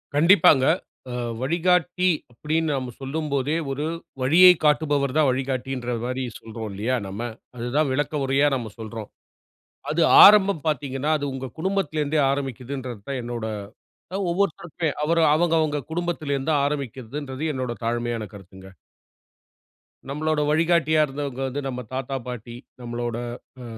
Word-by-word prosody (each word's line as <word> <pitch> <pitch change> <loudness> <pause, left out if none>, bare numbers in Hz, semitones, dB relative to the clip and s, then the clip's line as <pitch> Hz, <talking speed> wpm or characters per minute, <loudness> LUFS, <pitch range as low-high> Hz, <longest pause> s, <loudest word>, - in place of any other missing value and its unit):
கண்டிப்பாங்க. 155 -4 +6 0.5
அ - - -5 0.3
"வழிகாட்டி" 180 +4 +1 0.2
அப்படீன்னு 155 +6 -1
நாம 130 -2 -4
சொல்லும்போதே, 140 0 -1 0.2
ஒரு 145 +3 -2 0.4
வழியைக் 175 +6 +7
காட்டுபவர் 145 -3 +2
தான் 155 - +4
வழிகாட்டின்ற 130 -1 -2
மாரி 130 +1 -2 0.2
சொல்றோம் 110 -1 -7
இல்லையா 110 +6 -1
நம்ம? 100 +4 -6 0.4
அதுதான் 130 +5 0
விளக்க 145 +1 -1
உரையா 135 +2 +3
நாம 115 -5 -5
சொல்றோம். 110 -1 -7 0.8
அது 160 +2 +1 0.2
ஆரம்பம் 200 -5 +6
பார்த்தீங்கன்னா, 140 0 -1
அது 145 - -3
உங்க 135 0 -5
குடும்பத்திலேருந்தே 155 -5 0
ஆரம்பிக்குதுன்றது 130 -3 -5
தான் 135 -2 -2
என்னோட 120 -1 -4 0.7
அ - - 0
ஒவ்வொருத்தருக்கு 170 -2 -1 0.2
அவரு 165 +2 +2
அவங்கவங்க 160 -3 +2
குடும்பத்திலேருந்து 160 -4 -2
ஆரம்பிக்கிறதுன்றது 140 0 -4
என்னோட 130 -2 -3
தாழ்மையான 120 -1 -1
கருத்துங்க. 95 -1 -13 1.4
நம்மளோட 155 +2 0
வழிகாட்டியா 160 0 +3
இருந்தவங்க 135 -1 -5
வந்து 135 +2 -4
நம்ம 125 -1 -4
தாத்தா- 135 +1 -3
பாட்டி, 120 -1 -7 0.3
நம்மளோட 120 -1 -4 0.4
அ - - -8
140 Hz, 120 wpm, -24 LUFS, 125-155 Hz, 1.4 s, வழியைக்